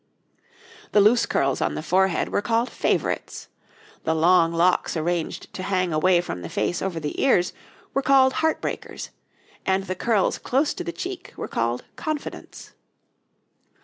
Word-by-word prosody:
The 210 Hz, -, +6 dB
loose 215 Hz, +4 st, +5 dB
curls 135 Hz, -1 st, 0 dB
on -, -, 0 dB
the 155 Hz, -, -4 dB
forehead 185 Hz, +2 st, +2 dB
were -, -, 0 dB
called 230 Hz, +3 st, 0 dB
'favorites'; -, -, -2 dB, 0.5 s
the 160 Hz, -, +1 dB
long 165 Hz, +1 st, +4 dB
locks 170 Hz, +1 st, +2 dB
arranged 170 Hz, +1 st, -2 dB
to -, -, -5 dB
hang 185 Hz, -3 st, 0 dB
away 175 Hz, +3 st, +4 dB
from 90 Hz, -, -6 dB
the -, -, -6 dB
face 175 Hz, -, -1 dB
over 185 Hz, -4 st, -2 dB
the 150 Hz, -2 st, -4 dB
ears 185 Hz, -10 st, +3 dB, 0.4 s
were 275 Hz, -, +1 dB
called 265 Hz, -1 st, +5 dB
'heart 320 Hz, 0 st, +1 dB
breakers'; -, -, -5 dB, 0.5 s
and 190 Hz, 0 st, +1 dB
the 185 Hz, -, -3 dB
curls 210 Hz, +1 st, +1 dB
close 280 Hz, +4 st, +1 dB
to 360 Hz, -, -5 dB
the 345 Hz, -, -4 dB
cheek 370 Hz, +1 st, -7 dB
were -, -, -4 dB
called 115 Hz, +1 st, -1 dB
'confidents.' 310 Hz, -2 st, -6 dB
185 Hz, 155 wpm, -24 LUFS, 170-245 Hz, 0.5 s, The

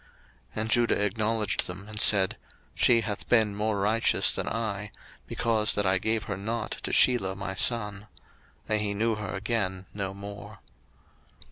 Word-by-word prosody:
01:038:026 -, -, -2 dB
And 110 Hz, -, -3 dB
Judah 120 Hz, -3 st, +2 dB
acknowledged 110 Hz, +1 st, -1 dB
them, 95 Hz, +3 st, -9 dB
and 105 Hz, -1 st, -3 dB
said, 95 Hz, -3 st, +6 dB, 0.4 s
She 120 Hz, -2 st, +3 dB
hath 105 Hz, -2 st, -6 dB
been 110 Hz, -4 st, +3 dB
more 105 Hz, 0 st, -1 dB
righteous 110 Hz, +3 st, +3 dB
than -, -, -3 dB
I; 105 Hz, -2 st, -3 dB, 0.4 s
because 110 Hz, -2 st, +1 dB
that 105 Hz, -, 0 dB
I 95 Hz, 0 st, +2 dB
gave 110 Hz, +2 st, -1 dB
her 95 Hz, -1 st, -5 dB
not 110 Hz, +3 st, -4 dB
to -, -, -4 dB
Shelah 95 Hz, -7 st, +3 dB
my 95 Hz, -1 st, -5 dB
son. 105 Hz, -1 st, 0 dB, 0.6 s
And 105 Hz, -1 st, 0 dB
he 100 Hz, -1 st, -2 dB
knew 115 Hz, +2 st, 0 dB
her 105 Hz, -2 st, -5 dB
again 95 Hz, -3 st, -2 dB
no 95 Hz, -1 st, -4 dB
more. 100 Hz, +1 st, -9 dB
105 Hz, 160 wpm, -27 LUFS, 100-110 Hz, 0.6 s, said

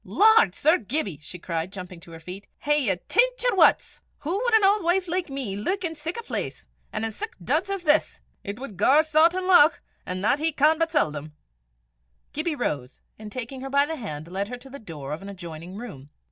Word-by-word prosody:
"Lord, 430 Hz, -, +5 dB
Sir 315 Hz, +4 st, +3 dB
Gibbie!" 210 Hz, -, -2 dB
she 160 Hz, +4 st, -8 dB
cried, 165 Hz, 0 st, -4 dB
jumping 180 Hz, -2 st, -8 dB
to 170 Hz, 0 st, -15 dB
her 165 Hz, -, -9 dB
feet, 180 Hz, +5 st, -9 dB
"hae 295 Hz, 0 st, +2 dB
ye 190 Hz, -, +3 dB
tint -, -, +2 dB
yer -, -, +2 dB
wuts? -, -, +3 dB, 0.2 s
Hoo 355 Hz, +8 st, -2 dB
wad 480 Hz, -2 st, +3 dB
an 440 Hz, -, +5 dB
auld 400 Hz, 0 st, +4 dB
wife 360 Hz, +2 st, +1 dB
like 355 Hz, -1 st, -2 dB
me 265 Hz, -8 st, -4 dB
luik 370 Hz, -, -2 dB
in 330 Hz, -2 st, -2 dB
sic 320 Hz, +4 st, -5 dB
a -, -, -7 dB
place -, -, -4 dB, 0.2 s
an' 215 Hz, -, -3 dB
in 225 Hz, -, -2 dB
sic -, -, -6 dB
duds 290 Hz, -, -1 dB
as 395 Hz, -2 st, -3 dB
this? 310 Hz, -1 st, +2 dB, 0.2 s
It 200 Hz, +1 st, -5 dB
wad 255 Hz, -8 st, -8 dB
gar 275 Hz, -, +5 dB
Sawtan 330 Hz, +4 st, +3 dB
lauch, 350 Hz, -4 st, +6 dB, 0.2 s
an' 185 Hz, 0 st, -4 dB
that 235 Hz, +8 st, +2 dB
he 320 Hz, +1 st, +1 dB
can 305 Hz, +3 st, +3 dB
but 330 Hz, 0 st, +1 dB
seldom." 155 Hz, -, -1 dB, 1.0 s
Gibbie 310 Hz, +1 st, -1 dB
rose, 140 Hz, -, -3 dB, 0.2 s
and 215 Hz, -1 st, -9 dB
taking 255 Hz, +2 st, -6 dB
her 270 Hz, -, -5 dB
by 280 Hz, +1 st, +3 dB
the 320 Hz, +2 st, -4 dB
hand, 155 Hz, -, -6 dB
led 195 Hz, +3 st, -3 dB
her 245 Hz, +2 st, -6 dB
to 260 Hz, +2 st, -15 dB
the 280 Hz, -, -8 dB
door 150 Hz, -, -7 dB
of 155 Hz, -, -6 dB
an 200 Hz, -, -8 dB
adjoining 175 Hz, -1 st, -8 dB
room. 175 Hz, -, -9 dB
270 Hz, 220 wpm, -25 LUFS, -, 1.0 s, lauch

